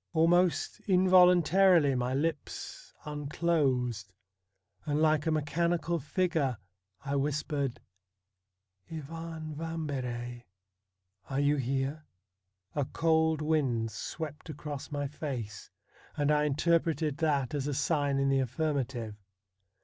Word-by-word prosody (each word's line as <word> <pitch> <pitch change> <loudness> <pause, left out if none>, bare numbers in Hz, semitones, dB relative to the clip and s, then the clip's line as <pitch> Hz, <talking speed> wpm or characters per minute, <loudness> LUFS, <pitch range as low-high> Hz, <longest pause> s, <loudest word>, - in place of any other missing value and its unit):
Almost 175 +2 +2
involuntarily 180 -3 +5
my 125 0 -1
lips 150 +1 -4
unclosed, 140 - 0 0.7
and 150 -1 -1
like 155 -1 +3
a - - +4
mechani 160 +3 +1
cal 170 0 -1
figure 150 - 0 0.5
I 140 0 -1
whispered: 140 -2 -1 0.6
' 95 - -34
Ivan 160 0 -6
Vambery, 130 -7 -4 0.8
are 135 0 -1
you 145 +1 +3
here? 135 +3 -2 0.3
' - - -57 0.3
A 145 - +1
cold 160 +1 +1
wind 130 -8 +1
swept 150 +8 -6
across 145 -1 -6
my 145 -1 -2
face, 125 -9 -6 0.5
and 145 0 +2
I 150 0 +3
interpreted 155 0 +1
that 145 -5 0
as 145 -1 -2
a 145 - -1
sign 145 -1 +1
in 135 0 +2
the 135 0 +3
affirmative. 130 -4 -2
145 Hz, 110 wpm, -30 LUFS, 135-160 Hz, 0.8 s, involuntarily